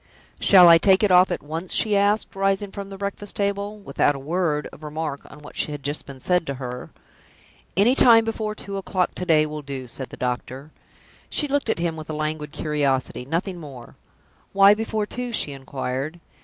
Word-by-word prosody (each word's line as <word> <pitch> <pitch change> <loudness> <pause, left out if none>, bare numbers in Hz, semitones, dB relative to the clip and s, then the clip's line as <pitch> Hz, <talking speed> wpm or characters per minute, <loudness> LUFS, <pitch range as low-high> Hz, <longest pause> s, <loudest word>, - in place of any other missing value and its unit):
"Shall 185 -3 +8
I 165 -1 +8
take 190 +3 +4
it 205 - +3
off 180 +1 +6
at - - -3
once?" 165 +5 -4
she 215 -2 +2
asked, 205 +1 +1
rising 195 +1 0
from 200 0 -7
the 195 - -8
breakfast 200 +1 -4
table, 200 +1 -2
without 145 -6 0
a - - -6
word 150 0 -1
of - - -14
remark 150 -1 -5
on 150 - -13
what 150 - -12
had 145 -2 -3
just 145 +2 -3
been 135 -1 -10
said 180 +3 +1
to 140 - -3
her. 125 -1 -7 0.9
"Anytime 230 +1 +6
before 220 -1 -3
two 200 -2 -6
o'clock 185 -1 -1
to 180 - -6
day 155 -2 +4
will 150 0 -6
do," 135 -2 -7
said 130 +2 -8
the - - -11
doctor. 130 +3 -4 0.6
She 295 - -1
looked 285 0 -1
at - - +1
him 170 -1 -1
with 155 0 -9
a - - -3
languid 155 -1 -3
curiosity 140 -5 -1
nothing 175 +5 -3
more. 135 -7 -11 0.6
"Why 195 +1 +7
before 220 0 -2
two?" 245 +3 -5
she 150 - 0
inquired. 135 +3 -5
165 Hz, 195 wpm, -23 LUFS, 145-200 Hz, 0.9 s, Shall